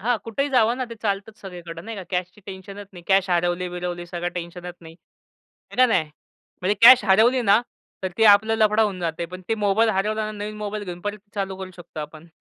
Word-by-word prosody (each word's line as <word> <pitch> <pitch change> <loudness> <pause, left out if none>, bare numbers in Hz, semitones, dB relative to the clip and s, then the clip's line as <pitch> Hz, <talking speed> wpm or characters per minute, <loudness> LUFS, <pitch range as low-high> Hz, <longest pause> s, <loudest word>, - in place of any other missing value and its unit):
हां, 240 +3 +1
कुठेही 275 +6 -2
जावं 240 -2 +3
ना, 255 - -2
ते - - -6
चालतंच 205 +1 -2
सगळीकडे, 175 -3 -9
नाही 220 +4 -7
का? 195 - -6
कॅशचं 180 +2 -3
टेन्शनच 195 +1 -9
नाही, 175 - -12
कॅश 195 -1 +3
हरवली-बिरवली, 175 0 -2
सगळं 175 0 -3
टेन्शनच 175 0 -7
नाही. 165 -1 -13 0.8
हो - - -11
का 255 0 +6
नाही? 185 -9 +2 0.6
म्हणजे 190 +3 +1
कॅश 245 -1 +9
हरवली 225 +6 +4
ना, 205 +1 +5 0.4
तर 190 - -1
तो 225 - +4
आपला 220 +2 +5
लफडा 215 0 +3
होऊन 200 -4 -1
जातो. 170 0 -3
पण 185 0 -8
तो 225 - 0
मोबाईल 210 +2 +2
हरवला 215 +2 -1
ना, 215 - -4
नवीन 210 +1 -5
मोबाईल 210 0 -5
घेऊन 175 -2 -7
परत 205 +2 -4 0.2
चालू 195 -2 -3
करू 190 -1 -7
शकतो 175 -3 -9
आपण. 155 +2 -9
195 Hz, 210 wpm, -23 LUFS, 180-215 Hz, 0.8 s, कॅश